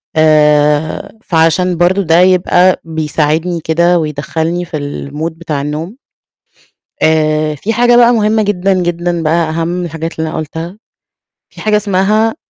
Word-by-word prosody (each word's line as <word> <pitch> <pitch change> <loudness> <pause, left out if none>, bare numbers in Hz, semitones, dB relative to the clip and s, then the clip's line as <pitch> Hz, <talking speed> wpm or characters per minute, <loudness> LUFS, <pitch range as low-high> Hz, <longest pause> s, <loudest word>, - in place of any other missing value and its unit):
آآ 150 -1 +2
فعشان 165 +1 +1
برضه 180 +3 +2
ده 165 -1 +3
يبقى 185 0 +3
بيساعدني 160 +1 -1
كده 170 +2 +2
ويدخلني 160 +3 -3
في 155 - -5 0.3
الmood 160 +3 -3
بتاع 160 -4 -4
النوم، 155 +8 -5 1.1
آآ 155 -1 +1
في 215 +10 -3
حاجة 240 +1 +3
بقى 240 0 +5
مهمة 215 0 +1
جدًا، 195 -1 0
جدًا 175 -1 -2
بقى 160 +1 +1
أهم 165 +1 -2
من 175 0 -3
الحاجات 165 0 -6
اللي 160 0 -2
أنا - - -5
قلتها 160 +5 -6 0.7
في - - -13
حاجة 215 -1 +2
اسمها، 210 +3 +1
165 Hz, 140 wpm, -13 LUFS, 155-185 Hz, 1.1 s, بقى